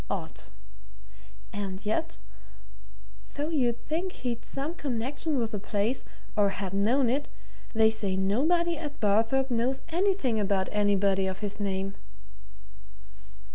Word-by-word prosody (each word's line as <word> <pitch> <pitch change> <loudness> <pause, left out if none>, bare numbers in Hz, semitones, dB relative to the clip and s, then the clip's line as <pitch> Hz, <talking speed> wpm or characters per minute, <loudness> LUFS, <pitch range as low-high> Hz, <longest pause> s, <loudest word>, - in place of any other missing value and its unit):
Odd! - - -4 1.1
And 200 0 -4
yet, 215 - -1 1.2
though 295 +2 -1
you'd 245 -7 0
think 350 +5 -1
he'd 240 -2 -3
some 280 +4 -3
connection 280 +1 -2
with 230 -3 0
the 210 - -2
place, 210 +5 0 0.3
or 205 -2 +4
had 195 -1 -4
known 235 +7 +3
it, 275 +5 0 0.5
they 220 0 +6
say 205 -4 0
nobody 315 - +2
at 295 -2 -6
Barthorpe 225 +6 +2
knows 245 +3 +1
anything 345 - +2
about 195 -2 +1
anybody 200 -2 +3
of 190 +1 -4
his 205 0 -2
name." 195 -1 -1
225 Hz, 125 wpm, -29 LUFS, 200-275 Hz, 1.2 s, they